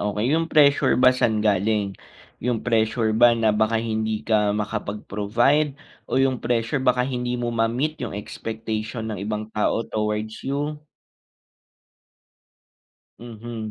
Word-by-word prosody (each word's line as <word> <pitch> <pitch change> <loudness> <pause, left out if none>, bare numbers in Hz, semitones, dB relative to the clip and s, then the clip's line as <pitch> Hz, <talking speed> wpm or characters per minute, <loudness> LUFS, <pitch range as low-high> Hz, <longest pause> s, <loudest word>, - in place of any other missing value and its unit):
okey. 105 +1 -1
Yung 165 +1 +1
pressure 145 -5 +4
ba 130 0 +6
saan 110 -4 +1
galing? 105 0 +1 0.5
Yung 120 -2 -1
pressure 110 -1 +1
ba 120 +1 +5
na 110 -2 +2
baka 110 +2 +1
hindi 110 -1 -2
ka 105 -2 +2
makapag-provide 105 +7 0 0.3
o - - -1
yung 130 -2 +2
pressure 120 +3 0
baka 125 -1 +2
hindi 125 -1 -2
mo 120 -1 -2
ma-meet 120 +7 -1
yung 115 -5 -4
expectation 110 +1 -5
ng 100 - -5
ibang 105 +1 -4
tao 105 +1 0
towards 105 0 -3
you? 145 +2 -3 2.4
Mhm. 115 -1 -7
115 Hz, 125 wpm, -23 LUFS, 105-125 Hz, 2.4 s, ba